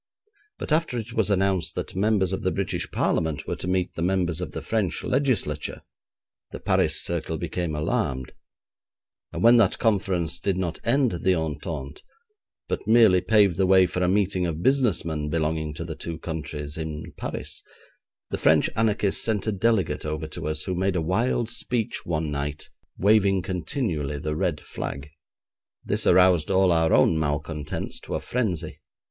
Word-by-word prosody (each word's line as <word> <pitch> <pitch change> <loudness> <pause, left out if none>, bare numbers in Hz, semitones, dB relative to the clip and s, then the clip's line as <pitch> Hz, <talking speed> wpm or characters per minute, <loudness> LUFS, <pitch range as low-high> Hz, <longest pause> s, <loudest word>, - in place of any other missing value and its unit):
But - - -6
after 155 -5 +1
it 115 0 -5
was 110 -2 +1
announced 95 -3 +1
that - - -5
members 95 -2 +2
of - - -2
the - - +1
British - - -2
Parliament 80 -3 0
were - - -3
to - - -6
meet 90 -1 0
the - - -5
members 90 -2 0
of 90 - -4
the - - -6
French 105 -7 -1
Legislature, 105 - -1 0.7
the - - -8
Paris - - +2
circle 80 -1 -2
became 85 -1 -3
alarmed, 65 -3 -1 1.0
and - - -4
when 120 +1 +7
that 105 -5 +3
conference 95 -6 0
did 95 -2 -1
not 90 -3 -2
end 130 +1 +2
the 95 -1 +3
entente, 75 -3 -4 0.7
but - - -3
merely 110 -5 +6
paved 100 -5 +3
the 95 -1 +2
way 95 0 +6
for 90 +1 -3
a 90 - +2
meeting 95 -1 +1
of 80 0 -4
business 130 - +2
men 75 -2 -3
belonging 80 0 -1
to 85 - -5
the 80 - -5
two 80 +1 -6
countries 75 -2 -5
in 80 -1 -6
Paris, - - -6 0.7
the - - -2
French - - +4
anarchists 105 -3 +1
sent 105 -4 0
a 110 - +1
delegate 105 -2 +1
over 75 +1 -3
to 75 -1 -6
us, 75 0 -1
who 95 - -3
made 95 +1 0
a - - +2
wild 115 +7 0
speech 120 -1 -2
one 80 -2 -1
night, 75 +1 -4 0.3
waving 100 -2 +3
continually 90 - -2
the 75 +2 -3
red 85 -2 -1
flag. 70 +2 -6 0.7
This - - +1
aroused 90 -3 +5
all 95 -1 +4
our 80 -1 +3
own 80 - +4
malcontents 75 0 -3
to - - -5
a - - -1
frenzy. 90 -10 -2
90 Hz, 170 wpm, -25 LUFS, 80-105 Hz, 1.0 s, when